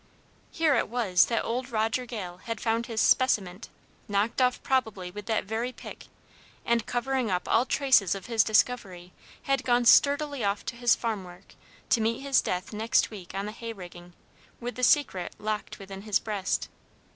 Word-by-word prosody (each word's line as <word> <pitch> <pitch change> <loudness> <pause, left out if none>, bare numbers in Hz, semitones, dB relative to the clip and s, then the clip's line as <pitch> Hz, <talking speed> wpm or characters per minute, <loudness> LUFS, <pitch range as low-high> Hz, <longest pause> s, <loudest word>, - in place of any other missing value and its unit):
Here 320 -3 +2
it - - +1
was 210 -7 +3
that 230 - -1
old 250 +3 -3
Roger 225 +2 -1
Gale 185 -7 -6
had 230 -2 -4
found 230 0 -1
his 225 -2 -3
"speciment," 205 -8 +2 0.4
knocked 205 +4 0
off 250 -1 +2
probably 220 -9 -1
with 205 +1 -9
that 220 -2 0
very 225 +5 -3
pick, - - -11 0.6
and, 235 -2 +1
covering 255 -1 -1
up 180 -1 -1
all 240 +3 +3
traces 255 -10 +3
of 195 - -8
his 230 -2 +3
discovery, 200 -6 0 0.3
had 275 -1 0
gone 245 -1 +2
sturdily 285 +1 +4
off 200 0 -1
to - - -4
his 240 0 +3
farm 220 -5 -3
work, 180 +1 -14 0.4
to 230 - +3
meet 230 +3 0
his 275 -1 +3
death 180 +3 -3
next 220 +2 +1
week 190 -5 -10
on 195 +1 -2
the 210 - -5
hay 230 +1 -7
rigging, 175 -3 -11 0.5
with 245 +1 -5
the 250 - -7
secret 250 - +2
locked 215 0 -4
within 195 0 -9
his 210 -1 +1
breast. 205 -3 -2
225 Hz, 180 wpm, -27 LUFS, 195-245 Hz, 0.6 s, sturdily